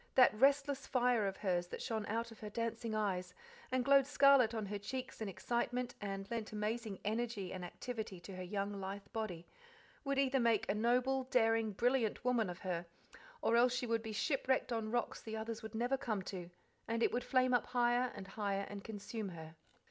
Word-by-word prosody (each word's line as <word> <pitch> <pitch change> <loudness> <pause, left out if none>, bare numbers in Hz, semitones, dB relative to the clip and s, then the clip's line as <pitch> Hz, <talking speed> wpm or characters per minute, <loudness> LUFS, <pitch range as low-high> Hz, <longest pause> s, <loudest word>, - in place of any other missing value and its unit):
That 255 -4 +7
restless 275 +4 +3
fire 245 -5 +3
of 195 - -3
hers 175 -3 0
that - - -6
shone 220 -4 -2
out 230 +2 -2
of 225 - -13
her 210 - -6
dancing 230 0 -2
eyes, 195 -4 -1 0.4
and 255 -1 +1
glowed 275 -1 +6
scarlet 275 -5 +6
on 220 -3 -2
her 205 +1 -4
cheeks 250 +4 -5
in 215 - -2
excitement, 245 +4 -1
and 195 -1 -4
lent 230 -2 -3
amazing 215 0 -2
energy 215 -3 -2
and 185 -1 -5
activity 215 +1 -5
to 190 +2 -8
her 185 - -6
young, 200 +2 -2
lithe 195 0 -5
body, 185 -7 -3 0.6
would 275 -1 -1
either 270 -1 +3
make 230 -3 +3
a - - +2
noble, 250 +4 +2
daring, 225 -3 +2
brilliant 245 +1 +1
woman 235 -5 +2
of 175 - -7
her, 175 -2 -3 0.6
or 230 - +3
else 245 +1 +5
she 250 - -1
would 230 -1 +1
be 220 -1 -5
shipwrecked 260 +2 +1
on 225 -1 -2
rocks 240 +1 -1
the 220 0 -5
others 220 0 -4
would 220 0 -7
never 245 +4 +1
come 220 -7 -2
to, 180 -2 -6 0.4
and 230 +1 0
it - - +3
would 245 - -1
flame 255 -1 +3
up 245 - +2
higher 245 0 +2
and 195 0 -8
higher 200 -1 -1
and 200 -1 -7
consume 215 0 -5
her. 160 -2 -9
225 Hz, 200 wpm, -36 LUFS, 200-245 Hz, 0.6 s, That